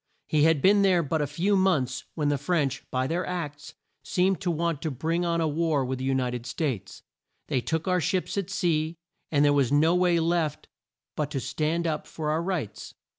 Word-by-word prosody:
He 150 -1 +3
had 160 -4 +3
been 200 +1 +6
there 185 -3 +4
but 155 +1 -1
a 145 - 0
few 200 +7 +1
months 145 -10 +1
when 150 -3 0
the 145 -1 0
French, 145 -3 0
by 130 0 0
their 170 +6 -1
acts, 150 -5 -5 0.3
seemed 185 -1 +1
to 180 - -1
want 165 -2 -1
to 160 - -1
bring 160 +6 -1
on 170 -1 +1
a 160 - +2
war 155 -2 +1
with 130 0 -3
the 130 - -3
U 135 0 +1
ni 125 -2 0
ted 120 0 -5
States. 125 - -3 0.5
They 130 - +1
took 160 +6 -2
our 180 -1 +2
ships 185 +4 -1
at 200 -3 -2
sea, 160 -1 0 0.3
and 145 -1 +4
there 145 - +4
was 140 -3 +2
no 155 +4 +4
way 180 -1 +3
left 165 -2 0 0.5
but 150 -2 -1
to 145 -2 -2
stand 155 +6 -1
up 155 -2 -2
for 155 -1 -3
our 160 +2 +1
rights. 160 - -4
155 Hz, 215 wpm, -27 LUFS, 140-170 Hz, 0.5 s, been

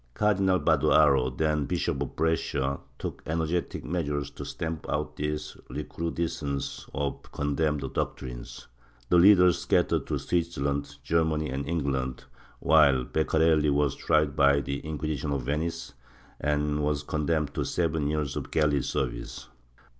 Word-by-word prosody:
Cardinal 100 -3 +2
Badoaro, 75 -4 +4
then 75 -2 +1
Bishop 70 - -1
of 70 - -4
Brescia, 70 -4 0 0.2
took - - -6
ener 80 +1 0
getic 85 +2 -2
measui'es 75 -4 -2
to - - -7
stamp 80 -1 -5
out 75 0 -2
this 75 +1 -3
recrudescence 80 -4 -3
of 70 0 -2
the - - -19
condemned 75 0 -1
doctrines; - - -5 0.4
the 90 - +5
leaders 90 -1 +6
scattered - - +1
to - - -1
Switzerland, 70 -5 -1
Germany 80 -3 +1
and 70 +2 -3
England, 65 -6 -2 0.4
while 70 -5 +5
Beccarelli 80 +1 +2
was 70 -1 +2
tried 75 -3 +1
by 70 -1 +5
the 70 0 -3
Inquisition 75 -2 -3
of 70 -3 -2
Venice 80 +2 -3 0.5
and 75 0 0
was 75 -1 0
condemned 75 0 -1
to - - -1
seven 80 -4 0
years 75 -2 -1
of - - -4
galley 75 -3 +2
service. - - -4
75 Hz, 135 wpm, -27 LUFS, 70-80 Hz, 0.5 s, leaders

